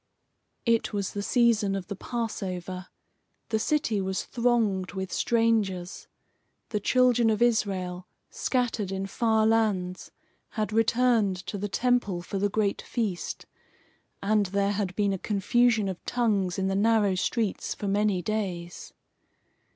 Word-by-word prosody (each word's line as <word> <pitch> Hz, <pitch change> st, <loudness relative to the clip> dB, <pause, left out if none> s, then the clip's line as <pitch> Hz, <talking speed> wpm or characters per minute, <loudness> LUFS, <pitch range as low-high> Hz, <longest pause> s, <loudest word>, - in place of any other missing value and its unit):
It 230 Hz, -2 st, +1 dB
was 200 Hz, -2 st, -2 dB
the 205 Hz, -, -3 dB
season 220 Hz, -3 st, +2 dB
of 195 Hz, -2 st, -4 dB
the 200 Hz, -, -5 dB
Passover. 185 Hz, -5 st, -4 dB, 0.6 s
The 220 Hz, -1 st, +1 dB
city 225 Hz, -5 st, 0 dB
was 190 Hz, 0 st, -2 dB
thronged 230 Hz, -6 st, 0 dB
with 190 Hz, -1 st, -4 dB
strangers. 215 Hz, -6 st, 0 dB, 0.6 s
The 210 Hz, -, -1 dB
children 245 Hz, +1 st, +3 dB
of 215 Hz, -1 st, +1 dB
Israel, 190 Hz, -6 st, 0 dB, 0.2 s
scattered 235 Hz, -6 st, -1 dB
in 195 Hz, 0 st, -2 dB
far 220 Hz, +1 st, +1 dB
lands, 205 Hz, -5 st, +1 dB, 0.5 s
had 215 Hz, 0 st, -1 dB
returned 225 Hz, -3 st, +3 dB
to -, -, -5 dB
the 205 Hz, +1 st, -3 dB
Temple 220 Hz, -6 st, +1 dB
for 195 Hz, -, -4 dB
the 205 Hz, +1 st, +1 dB
great 205 Hz, -1 st, 0 dB
feast, 210 Hz, -7 st, -3 dB, 0.8 s
and 205 Hz, 0 st, +2 dB
there 200 Hz, +1 st, +1 dB
had 195 Hz, -3 st, -2 dB
been 200 Hz, -1 st, +1 dB
a 190 Hz, -, -3 dB
confusion 220 Hz, +2 st, +2 dB
of 185 Hz, -2 st, -5 dB
tongues 205 Hz, -7 st, 0 dB
in 190 Hz, -, 0 dB
the 195 Hz, -, 0 dB
narrow 210 Hz, 0 st, +3 dB
streets 210 Hz, +3 st, -1 dB
for 205 Hz, -, -5 dB
many 200 Hz, -2 st, +1 dB
days. 180 Hz, -5 st, -4 dB
205 Hz, 135 wpm, -27 LUFS, 190-230 Hz, 0.8 s, children